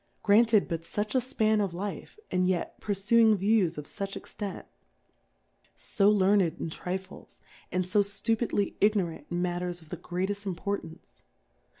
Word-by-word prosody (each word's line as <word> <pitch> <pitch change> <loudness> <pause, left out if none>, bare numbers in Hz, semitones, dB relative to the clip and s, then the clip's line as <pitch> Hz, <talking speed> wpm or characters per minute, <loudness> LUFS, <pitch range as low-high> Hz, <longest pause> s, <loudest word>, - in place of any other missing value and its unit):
Granted 215 0 +5
but 165 -1 -3
fuch 210 +5 -3
a 260 - +3
Span 220 -4 +1
of 190 -4 -2
Life, 200 - -6
and 180 0 +2
yetpurfu 200 +4 0
ing 220 -2 +6
Views 195 -4 +2
of 150 - -5
fuch 195 +5 -5
Extent? 200 -4 -6 1.1
So 200 +1 +2
Learned 200 0 +4 0.2
In. 165 - -4
Trifles, 185 +3 -6 0.3
and 180 0 0
fo 205 +3 +3
ftupidly 205 +1 0
Ignorant 190 -8 +1
in 175 0 -1
Matters 175 0 -2
of 160 -2 -17
the 180 - -5
grcatefl: 195 +5 -3
Importance 170 - -5
195 Hz, 140 wpm, -28 LUFS, 180-210 Hz, 1.1 s, ing